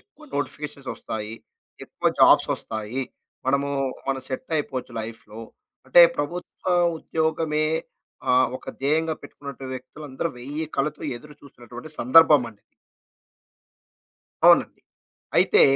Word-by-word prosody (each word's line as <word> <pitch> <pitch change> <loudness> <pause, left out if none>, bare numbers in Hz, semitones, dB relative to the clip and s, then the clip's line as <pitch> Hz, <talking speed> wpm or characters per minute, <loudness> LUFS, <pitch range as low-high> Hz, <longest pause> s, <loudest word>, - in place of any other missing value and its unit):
ఎక్కువ 315 -7 -20
నోటిఫికెషన్స్‌సొస్తాయి. 135 -7 -5 0.5
ఎక్కువ - - -1
జాబ్స్‌సొస్తాయి. 110 +4 +3 0.4
మనము 140 +1 +1 0.4
మనం 135 -1 -1
సెట్టయిపోచ్చు 135 -2 -3
లైఫ్‌లో. 110 0 -9 0.5
అంటే, 175 - +9 0.2
ప్రభుత్వ 170 +5 -5 0.3
ఉద్యోగమే 160 -1 0 0.7
ఆహ్, 125 0 +4
ఒక - - -17
ధ్యేయంగా 160 +3 +1
పెట్టుకున్నటి 140 -2 -10
వ్యక్తులందరూ 130 +4 -5
వెయ్యి 145 +6 -4
కళ్ళతో 150 +2 -1 0.2
ఎదురు 150 +5 -13
చూస్తున్నటువంటి 125 0 -12
సందర్భమండి. 125 -6 +5 1.9
అవునండి. - - +5 0.6
అయితే, - - +5
140 Hz, 90 wpm, -24 LUFS, 125-155 Hz, 1.9 s, అంటే